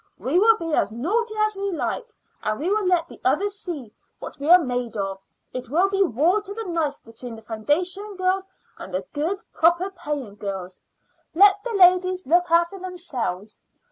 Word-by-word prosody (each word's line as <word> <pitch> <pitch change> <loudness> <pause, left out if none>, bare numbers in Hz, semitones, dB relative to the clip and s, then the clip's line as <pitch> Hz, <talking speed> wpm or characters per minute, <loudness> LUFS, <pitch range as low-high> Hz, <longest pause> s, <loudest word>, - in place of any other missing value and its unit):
We 265 - +1
will 445 +2 +6
be 330 -4 -4
as 200 -7 +2
naughty 430 - -1
as 430 -1 -3
we 395 0 -2
like, 335 - -3 0.3
and 215 +2 -2
we 340 +6 -1
will 420 -2 +1
let 350 -2 +2
the - - -14
others 405 0 +1
see 310 - -7 0.2
what - - -9
we 285 +3 -3
are 355 - +10
made 245 -8 -3
of. 195 -1 -3 0.3
It 255 -2 -6
will 350 +8 +3
be 390 0 0
war 350 - +3
to 405 0 -7
the 450 - -4
knife 325 -7 -2
between 230 +1 -9
the 220 - -13
foundation 350 - -1
girls 375 +1 0 0.3
and - - -8
the 185 +1 -3
good, 335 +8 -2
proper, 345 +4 +3
paying 280 - -5
girls. 190 -3 -6 0.5
Let 405 +2 +6
the 485 - -4
ladies 365 -1 +4
look 350 +4 +3
after 340 +3 +2
themselves. 265 - -5
340 Hz, 185 wpm, -23 LUFS, 245-390 Hz, 0.5 s, are